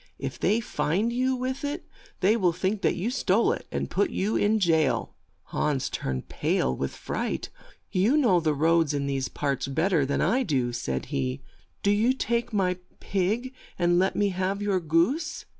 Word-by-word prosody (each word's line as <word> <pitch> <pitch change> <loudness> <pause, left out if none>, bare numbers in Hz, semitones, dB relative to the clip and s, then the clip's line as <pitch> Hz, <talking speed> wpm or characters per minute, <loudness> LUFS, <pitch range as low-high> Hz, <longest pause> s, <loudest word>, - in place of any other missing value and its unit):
If - - -5
they 215 - +2
find 190 +5 0
you 260 +1 +1
with 255 +2 -3
it 290 +4 -3 0.4
they 200 +4 +4
will 180 -6 +2
think 190 +4 -1
that - - +2
you 205 +7 -2
stole 230 -4 +2
it, - - -4
and - - -1
may - - -5
put 395 - +1
you 205 -4 -1
in 210 +2 +3
jail." 160 -8 +2 0.4
Hans 145 -4 0
turned 65 -1 -3
pale 65 - 0
with 70 - -3
fright. - - -3 0.4
"You 210 +10 +3
know 230 -12 +4
the 155 -2 0
roads 160 0 +3
in 140 -1 -1
these 135 -1 -1
parts 140 -2 -2
bet 160 +8 0
ter 160 -6 +3
than 140 - -1
I 255 +3 +2
do," 130 - 0
said 70 - -3
he. 65 0 -2 0.4
"Do 200 - +4
you 220 +5 +3
take 235 -2 -1
my 185 -4 +1 0.2
pig 215 +7 -1 0.2
and 175 0 +3
let 190 +1 +1
me 205 -1 +2
have 190 +1 -1
your 205 -2 +1
goose." 170 - 0
185 Hz, 190 wpm, -26 LUFS, 150-225 Hz, 0.4 s, they